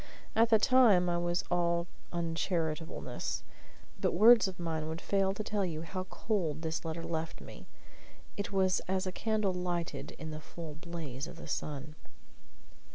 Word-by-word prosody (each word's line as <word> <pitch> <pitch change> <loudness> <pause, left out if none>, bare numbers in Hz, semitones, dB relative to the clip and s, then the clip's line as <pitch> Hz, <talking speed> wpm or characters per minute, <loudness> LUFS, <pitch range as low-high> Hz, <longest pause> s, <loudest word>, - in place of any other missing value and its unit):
At 225 +1 +5
the 225 - +7
time 215 -7 +5
I 175 - +1
was 175 0 0
all 170 -1 +2 0.3
uncharitableness; 165 -5 -2 0.6
but - - +1
words 225 +3 +8
of 185 -1 -7
mine 160 -2 -2
would 160 +1 -4
fail 195 0 +2
to 215 - -3
tell 210 -1 0
you 165 -3 -2
how 185 +3 -4
cold 175 -7 -1
this 160 0 -2
letter 165 0 -4
left 165 -1 -3
me; - - -11 0.7
it 200 -1 -3
was 190 -2 +3
as 190 +1 0
a 185 - -2
candle 215 -1 0
lighted 175 -1 -3
in 160 0 -6
the 155 0 -6
full 160 0 -8
blaze 160 -4 -6
of - - -9
the 165 - -9
sun. 150 0 -4
175 Hz, 160 wpm, -32 LUFS, 160-190 Hz, 0.7 s, words